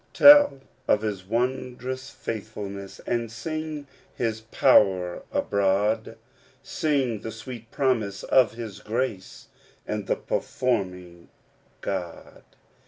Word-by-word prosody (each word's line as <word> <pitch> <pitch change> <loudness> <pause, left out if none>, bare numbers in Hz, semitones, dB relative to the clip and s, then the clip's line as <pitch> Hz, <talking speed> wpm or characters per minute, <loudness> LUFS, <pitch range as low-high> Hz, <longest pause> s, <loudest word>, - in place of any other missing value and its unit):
'Tell 290 - +8 0.3
of 105 - +3
his 100 -4 -3
wondrous 125 +3 -2
faithfulness, 100 -3 -6
And 115 -2 -1
sound 155 +5 -5 0.3
his 110 -2 -2
power 90 -6 +4
abroad; 105 +3 +1 0.5
Sing 135 -7 0
the 110 - -6
sweet 115 +1 -9
promise 115 -8 0
of 130 -4 +4
his 115 -4 -7
grace, 110 -4 -4 0.4
And 105 -2 -4
the - - +2
performing 90 -8 -2 0.5
God. 90 -4 -5
110 Hz, 100 wpm, -26 LUFS, 100-130 Hz, 0.5 s, Tell